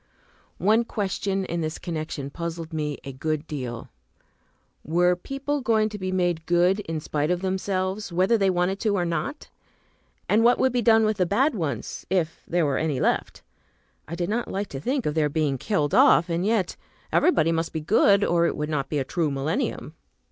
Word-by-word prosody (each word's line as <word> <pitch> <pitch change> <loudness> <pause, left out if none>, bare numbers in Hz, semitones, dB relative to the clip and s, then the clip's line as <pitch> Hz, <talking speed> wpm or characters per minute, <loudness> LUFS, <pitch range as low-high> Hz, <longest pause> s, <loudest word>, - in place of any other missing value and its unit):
One 215 +6 +3
question 195 -3 -2
in 170 -1 -3
this 155 0 -3
connection 155 -4 -5
puzzled 165 0 -5
me 150 -2 -2
a 135 +1 -7
good 155 +3 -2
deal. 125 -7 -6 0.9
Were 175 +3 +2
people 275 +8 -3
going 220 -3 +2
to 210 -1 -7
be 185 0 -3
made 175 -3 0
good 175 +3 +3
in 165 -6 -4
spite 150 0 -2
of 180 0 0
themselves, 190 +1 -2
whether 185 +6 +3
they 195 -3 +2
wanted 180 +2 0
to 205 -2 +1
or 175 - 0
not? 170 - -4 0.8
And 220 +2 +3
what 240 +1 +5
would 260 -1 +2
be 245 - +1
done 225 -1 +5
with 215 -1 0
the 180 -3 +1
bad 260 - +2
ones, 145 - -4
if 170 -3 -1
there 175 -1 +1
were 140 -2 0
any 150 -5 -1
left? - - -1 0.6
I 170 - -5
did 175 0 -2
not 230 +4 -1
like 200 +1 -3
to 135 - -6
think 260 - -1
of 150 - 0
their 155 -1 +1
being 145 -3 0
killed 150 - 0
off, 170 - +5
and 170 +1 0
yet 215 -5 +1 0.4
everybody 165 - +3
must 165 0 -1
be 160 - -3
good, 200 +4 +4
or 170 -2 +3
it - - -3
would 150 0 -2
not 140 -3 -2
be 150 - -1
a 140 - +1
true 160 +2 -1
millennium. 145 - -2
175 Hz, 195 wpm, -25 LUFS, 155-205 Hz, 0.9 s, what